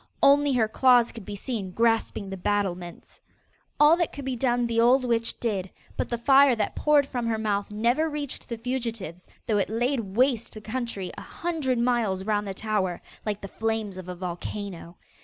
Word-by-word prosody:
Only 285 Hz, 0 st, +5 dB
her 230 Hz, -3 st, +3 dB
claws 245 Hz, +1 st, +4 dB
could 225 Hz, -5 st, -10 dB
be 205 Hz, -, -6 dB
seen 205 Hz, -2 st, -4 dB
grasping 225 Hz, -2 st, +1 dB
the -, -, -3 dB
battlements. 185 Hz, -3 st, -3 dB, 0.6 s
All 295 Hz, +2 st, +7 dB
that 345 Hz, -2 st, 0 dB
could 280 Hz, -, -8 dB
be 265 Hz, -1 st, -2 dB
done 245 Hz, -1 st, +1 dB
the 230 Hz, -1 st, +1 dB
old 250 Hz, +2 st, +4 dB
witch 230 Hz, -1 st, 0 dB
did; 195 Hz, -5 st, -2 dB, 0.3 s
but -, -, -2 dB
the 235 Hz, -, -1 dB
fire 270 Hz, +2 st, +5 dB
that 220 Hz, -, -2 dB
poured 295 Hz, -2 st, +4 dB
from 245 Hz, -3 st, -3 dB
her 225 Hz, -1 st, 0 dB
mouth 210 Hz, -2 st, -1 dB
never 240 Hz, +9 st, +1 dB
reached 290 Hz, -3 st, -5 dB
the 235 Hz, -, -3 dB
fugitives, 225 Hz, -8 st, -4 dB, 0.2 s
though 210 Hz, -2 st, +1 dB
it 195 Hz, -, 0 dB
laid 240 Hz, +5 st, 0 dB
waste 230 Hz, +4 st, 0 dB
the 215 Hz, -, -8 dB
country 220 Hz, -5 st, -4 dB
a -, -, -8 dB
hundred 315 Hz, -7 st, -2 dB
miles 235 Hz, -6 st, +1 dB
round 210 Hz, 0 st, 0 dB
the 195 Hz, -, -4 dB
tower, 195 Hz, -4 st, -1 dB, 0.3 s
like 210 Hz, -1 st, -2 dB
the 200 Hz, -, -6 dB
flames 220 Hz, -1 st, -2 dB
of 185 Hz, -1 st, -8 dB
a 180 Hz, -, -5 dB
volcano. 175 Hz, 0 st, -6 dB
230 Hz, 190 wpm, -26 LUFS, 200-250 Hz, 0.6 s, All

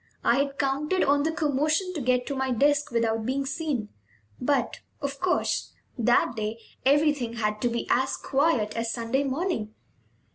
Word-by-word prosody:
I 240 Hz, -, +4 dB
had 280 Hz, 0 st, 0 dB
counted 295 Hz, +6 st, +1 dB
on 285 Hz, +1 st, +3 dB
the 320 Hz, +2 st, +1 dB
commotion 310 Hz, +4 st, 0 dB
to 310 Hz, -, -3 dB
get 250 Hz, 0 st, +1 dB
to 280 Hz, -, -3 dB
my 265 Hz, 0 st, -1 dB
desk 290 Hz, +4 st, +2 dB
without 225 Hz, -1 st, 0 dB
being 270 Hz, +4 st, -1 dB
seen; 270 Hz, -7 st, -2 dB, 0.5 s
but, 255 Hz, -2 st, 0 dB, 0.2 s
of 280 Hz, -1 st, -4 dB
course, 365 Hz, -1 st, 0 dB, 0.2 s
that 240 Hz, 0 st, +3 dB
day 215 Hz, +1 st, -3 dB, 0.2 s
everything 285 Hz, -3 st, +2 dB
had 210 Hz, -2 st, -2 dB
to 245 Hz, -, +2 dB
be 235 Hz, 0 st, -2 dB
as 260 Hz, +2 st, +2 dB
quiet 270 Hz, -7 st, +1 dB
as 230 Hz, 0 st, -1 dB
Sunday 235 Hz, +4 st, 0 dB
morning. 270 Hz, -, -2 dB
265 Hz, 160 wpm, -26 LUFS, 235-290 Hz, 0.5 s, I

